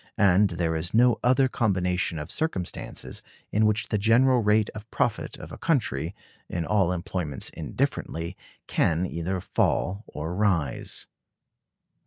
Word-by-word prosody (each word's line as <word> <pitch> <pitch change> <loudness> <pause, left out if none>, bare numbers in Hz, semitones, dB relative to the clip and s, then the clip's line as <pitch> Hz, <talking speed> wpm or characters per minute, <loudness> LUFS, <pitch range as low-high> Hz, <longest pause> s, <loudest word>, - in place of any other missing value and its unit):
And 100 0 +5
there 85 -2 -1
is 85 +5 -2
no 120 0 +5
other 130 +2 +4
combination 90 -7 0
of 75 +2 -5
circumstances 125 - -3 0.3
in 110 +1 +3
which 110 +1 0
the 105 - +1
general 120 +4 +4
rate 105 0 +3
of 105 +1 -10
profit 115 -2 -1
of - - -10
a - - -9
country, 95 - 0 0.3
in 85 -2 -2
all 100 -4 +2
employments 90 -5 -3
indifferently, 85 +3 -3 0.3
can 85 +2 +1
either 90 +2 -2
fall 95 +3 0
or 80 +3 -5
rise. 90 -9 0
95 Hz, 135 wpm, -26 LUFS, 85-110 Hz, 0.3 s, And